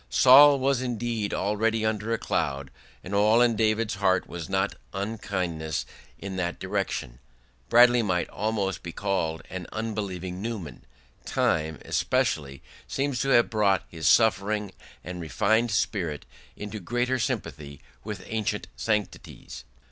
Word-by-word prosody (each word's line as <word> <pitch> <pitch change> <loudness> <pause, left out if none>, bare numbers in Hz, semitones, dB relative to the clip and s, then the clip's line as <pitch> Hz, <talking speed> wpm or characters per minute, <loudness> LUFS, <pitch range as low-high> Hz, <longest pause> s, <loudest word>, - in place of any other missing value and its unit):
Saul 135 - +8
was 135 -1 +1
indeed 120 -4 -2
already 110 +2 0
under 110 0 -1
a 115 - +1
cloud, 70 -8 -2 0.3
and 95 - -7
all 105 +3 +4
in 120 -2 +4
David's 110 0 +1
heart 95 -2 +1
was 85 +1 -7
not 95 +1 0 0.2
unkindness 95 -7 -3 0.3
in 95 -1 -6
that 90 -1 -2
direction. - - -3 0.5
Bradley 120 0 +6
might 90 -5 0
almost 100 -4 -2
be 85 - -7
called 95 -5 -2
an 90 -1 -6
unbelieving 95 -5 -4
Newman; 100 - -6 0.4
time, 80 0 0
especially, 70 -3 -1 0.2
seems 135 -2 -1
to 135 - -1
have 120 -2 +4
brought 100 -4 +2
his 80 -2 -3
suffering 105 -2 +3 0.3
and 90 0 -6
refined 110 +8 +1
spirit 90 - -1 0.3
into 105 +1 -6
greater 120 +6 -1
sympathy 75 - -4 0.2
with 100 -3 -6
ancient 110 -2 -2
sanctities. 105 -3 -4
100 Hz, 130 wpm, -26 LUFS, 90-115 Hz, 0.5 s, Saul